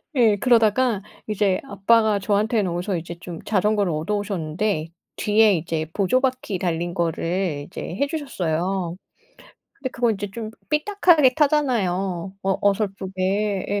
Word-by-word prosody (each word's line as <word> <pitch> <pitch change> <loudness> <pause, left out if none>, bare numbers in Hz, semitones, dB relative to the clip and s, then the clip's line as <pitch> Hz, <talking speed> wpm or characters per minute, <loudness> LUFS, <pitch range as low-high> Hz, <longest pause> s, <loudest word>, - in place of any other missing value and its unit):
예. 225 -5 +4
그러다가 230 -1 +3 0.3
이제 205 -3 +1
아빠가 220 -1 +3
저한테는 205 -1 +1
어디서 180 +2 -2
이제 170 +1 -6
좀 170 -2 -8
자전거를 205 -2 +1
얻어 160 +7 -1
오셨는데 185 -3 -2 0.3
뒤에 210 -1 +4
이제 160 0 -2
보조 210 +6 +2
바퀴 255 -7 -1
달린 175 -1 -2
거를 170 -2 -1
이제 - - -8
해 280 +11 -2
주셨어요. 185 - -2 0.8
근데 260 -2 -5
그거 240 -2 +1
이제 205 -1 -3
좀 225 0 -6 0.2
삐딱하게 310 -5 +4
타잖아요, 195 - 0
어 195 0 0
어설프게. 195 0 0
예. 205 0 0
200 Hz, 305 characters per minute, -23 LUFS, 180-225 Hz, 0.8 s, 예